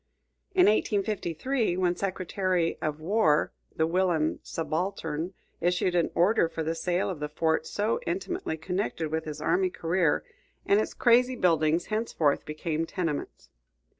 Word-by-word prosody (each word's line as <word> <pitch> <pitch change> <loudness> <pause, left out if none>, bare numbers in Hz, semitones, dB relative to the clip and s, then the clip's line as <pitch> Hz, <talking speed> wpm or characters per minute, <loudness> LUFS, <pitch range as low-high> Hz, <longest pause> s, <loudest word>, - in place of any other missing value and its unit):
In 365 - +6
1853, 210 - +1
when 180 -1 +2
Secretary 185 -2 -1
of 155 -1 -2
War, 160 -3 +2 0.2
the 160 - +2
whilom 170 -2 +1
subaltern 165 +1 -3 0.2
issued 180 +1 +1
an 175 -2 +2
order 175 -1 +3
for 165 - -4
the 160 +1 -1
sale 175 +2 0
of 180 -5 -4
the 150 0 -3
fort 160 +1 0
so 210 - 0
intimately 360 - -2
connected 175 -1 -2
with 160 0 -2
his 150 -1 -6
army 370 0 +2
career, 170 - +1 0.4
and 200 - +4
its - - -4
crazy 250 +1 +4
buildings 165 -4 +2
henceforth 190 -10 +1
became 155 +1 -2
tenements. 165 -6 -4
175 Hz, 135 wpm, -28 LUFS, 160-200 Hz, 0.4 s, In